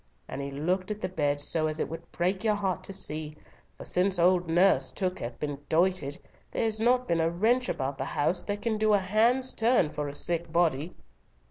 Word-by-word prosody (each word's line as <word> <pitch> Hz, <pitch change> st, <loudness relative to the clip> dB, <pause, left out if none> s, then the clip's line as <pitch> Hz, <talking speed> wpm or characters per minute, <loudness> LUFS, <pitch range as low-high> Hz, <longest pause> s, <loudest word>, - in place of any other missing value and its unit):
And 135 Hz, -, -5 dB
he 140 Hz, -, -4 dB
looked 180 Hz, +7 st, -1 dB
at 210 Hz, 0 st, -3 dB
the 185 Hz, -, -2 dB
bed 145 Hz, -5 st, 0 dB
so 155 Hz, +2 st, +1 dB
as 155 Hz, 0 st, -2 dB
it -, -, 0 dB
would 165 Hz, +1 st, -9 dB
break 185 Hz, +4 st, -1 dB
your 215 Hz, -2 st, +2 dB
heart 190 Hz, -2 st, -2 dB
to -, -, -6 dB
see, 155 Hz, -5 st, -4 dB, 0.4 s
for -, -, -9 dB
since 185 Hz, +1 st, +1 dB
old 175 Hz, 0 st, +3 dB
Nurse 165 Hz, -6 st, +3 dB
Took 185 Hz, +5 st, -2 dB
hath 120 Hz, 0 st, -6 dB
been 145 Hz, -2 st, -3 dB
doited, 165 Hz, -4 st, +1 dB, 0.3 s
there's 220 Hz, -1 st, 0 dB
not 250 Hz, +2 st, +3 dB
been 165 Hz, -1 st, +1 dB
a 165 Hz, -, +2 dB
wench 230 Hz, +9 st, +1 dB
about 135 Hz, 0 st, -3 dB
the 135 Hz, -, -2 dB
house 170 Hz, +6 st, 0 dB
that 205 Hz, 0 st, -3 dB
can 220 Hz, -2 st, 0 dB
do 215 Hz, -1 st, +3 dB
a -, -, +6 dB
hand's 230 Hz, +7 st, +2 dB
turn 225 Hz, -9 st, +2 dB
for 150 Hz, -1 st, -3 dB
a 140 Hz, -, -9 dB
sick 170 Hz, +1 st, -2 dB
body." 165 Hz, -1 st, +1 dB
175 Hz, 215 wpm, -28 LUFS, 155-205 Hz, 0.4 s, a